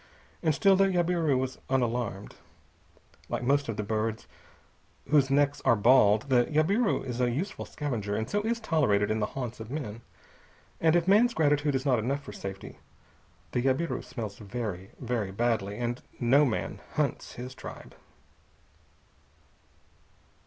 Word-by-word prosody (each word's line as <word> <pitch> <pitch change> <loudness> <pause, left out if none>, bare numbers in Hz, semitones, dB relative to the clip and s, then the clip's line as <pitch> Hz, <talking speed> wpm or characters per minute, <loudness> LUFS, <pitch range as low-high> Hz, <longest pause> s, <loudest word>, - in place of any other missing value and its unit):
And 155 -3 +2
still 195 +3 +5
the 195 +1 +4
jabiru 175 -6 +1
was 130 0 -3
unalarmed. 120 -5 -1 1.0
Like - - -2
most 140 +1 +2
of 110 - -3
the 105 - -1
birds 110 +1 -2 0.8
whose 145 -3 +4
necks 145 +1 +2
are 125 -3 +5
bald, 110 -1 +5
the 125 -3 +3
jabiru 190 - +1
is 125 -1 -3
a 125 - +3
useful 175 - -3
scavenger, 115 -9 -3
and 110 +1 -2
so 205 +9 0
is 230 +2 -1
tolerated 135 - +2
in 110 - 0
the 105 - 0
haunts 125 -4 -4
of 110 0 -8
men. 120 -6 -5 0.8
And 160 0 +3
if 175 0 +2
man's 230 +5 +5
gratitude 145 -2 +2
is 130 +1 -1
not 130 -4 +3
enough 135 +6 -2
for 105 - -9
safety, 100 -1 -8 0.7
the 125 - 0
jabiru 135 +1 0
smells 115 -5 -6
very, 100 -3 -5
very 120 -5 -2
badly, 105 -1 -1
and 120 +1 -3 0.2
no 135 +5 +5
man 120 - -3
hunts - - -1
his 125 +1 -7
tribe. - - -10
125 Hz, 150 wpm, -28 LUFS, 110-150 Hz, 1.0 s, still